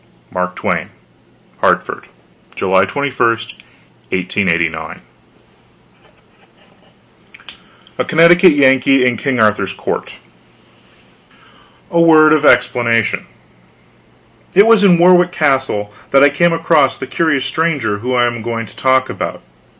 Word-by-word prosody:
MARK 90 0 -4
TWAIN - - -3 0.7
HARTFORD, - - -1 0.5
July 95 0 +1
21, 130 +3 -1 0.8
1889 85 -3 -2 3.0
A - - -1
CONNECTICUT 170 +2 +4
YANKEE 135 -2 +2
IN 125 -1 +1
KING 125 +2 -3
ARTHUR'S 105 -3 0
COURT - - -6 1.8
A 170 - +2
WORD 155 -2 +5
OF 155 -2 +1
EXPLANATION 115 -6 +1 1.3
It 200 +3 +6
was 225 -2 +4
in 180 -4 +4
Warwick 180 0 +4
Castle 135 -10 -1 0.2
that 135 0 +3
I 145 - +4
came 170 +4 +1
across 165 -4 +1
the - - -7
curious 140 0 -1
stranger 130 -7 -2
whom 125 +3 -3
I 120 -1 +2
am 120 -1 -4
going 115 0 -5
to - - -16
talk 130 0 +1
about. - - -6
130 Hz, 110 wpm, -15 LUFS, 110-160 Hz, 3.0 s, It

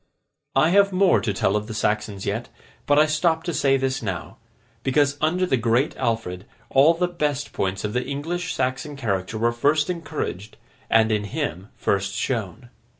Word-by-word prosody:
I 135 +4 +4
have 200 +1 +5
more 185 - +4
to 110 0 -1
tell 100 0 +1
of 105 0 -1
the 110 - -6
Saxons 105 -2 -1
yet, 110 +4 -3 0.4
but 145 - +4
I 155 - +7
stop 160 +1 +1
to 175 - -3
say 135 -2 +3
this 135 0 -1
now, 95 -6 -5 0.4
because 140 +2 +2
under 180 +4 +2
the 135 -7 +1
Great 120 +4 +1
Alfred, 110 -5 -2 0.2
all 145 +5 +5
the 180 +1 +1
best 150 -5 -2
points 95 0 -2
of 105 0 -2
the 125 - 0
English 160 +7 -3
Saxon 145 +4 -2
character 105 -5 -2
were 115 +2 +2
first 145 +7 +2
encouraged, 155 - -5 0.3
and 110 0 +4
in 105 -1 0
him 105 - -4
first 100 0 0
shown. 115 -1 -3
130 Hz, 175 wpm, -23 LUFS, 105-155 Hz, 0.4 s, I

